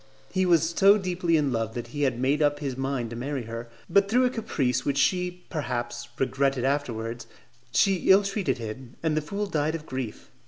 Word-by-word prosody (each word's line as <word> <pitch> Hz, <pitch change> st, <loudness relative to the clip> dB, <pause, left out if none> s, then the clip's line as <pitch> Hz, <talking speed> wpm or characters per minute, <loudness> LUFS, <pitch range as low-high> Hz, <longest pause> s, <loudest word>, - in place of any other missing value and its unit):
He 185 Hz, -1 st, +1 dB
was 165 Hz, -2 st, +4 dB
so 195 Hz, +4 st, +6 dB
deeply 180 Hz, -3 st, +1 dB
in 145 Hz, -3 st, +1 dB
love 115 Hz, -2 st, -2 dB
that 120 Hz, -1 st, -5 dB
he 145 Hz, +4 st, -5 dB
had 130 Hz, -4 st, +1 dB
made 135 Hz, +4 st, +1 dB
up 145 Hz, -1 st, +3 dB
his 140 Hz, -3 st, -3 dB
mind 135 Hz, -3 st, -2 dB
to -, -, -5 dB
marry 135 Hz, +2 st, -3 dB
her; 115 Hz, +1 st, -7 dB, 0.2 s
but 200 Hz, 0 st, +3 dB
through 250 Hz, +4 st, +4 dB
a 250 Hz, -, +2 dB
caprice 130 Hz, -, -1 dB
which 140 Hz, -1 st, -1 dB
she, 180 Hz, +4 st, +1 dB
perhaps, 120 Hz, -5 st, -3 dB
regretted 135 Hz, -1 st, +1 dB
afterwards, 120 Hz, -4 st, -2 dB, 0.4 s
she 195 Hz, +5 st, +2 dB
ill 195 Hz, +2 st, +7 dB
treated 195 Hz, -, -1 dB
him, 120 Hz, +2 st, -7 dB
and 160 Hz, -2 st, +1 dB
the 155 Hz, -, +1 dB
fool 200 Hz, +7 st, -3 dB
died 155 Hz, -4 st, 0 dB
of 160 Hz, -2 st, -6 dB
grief. 130 Hz, -6 st, -6 dB
145 Hz, 200 wpm, -26 LUFS, 125-180 Hz, 0.4 s, ill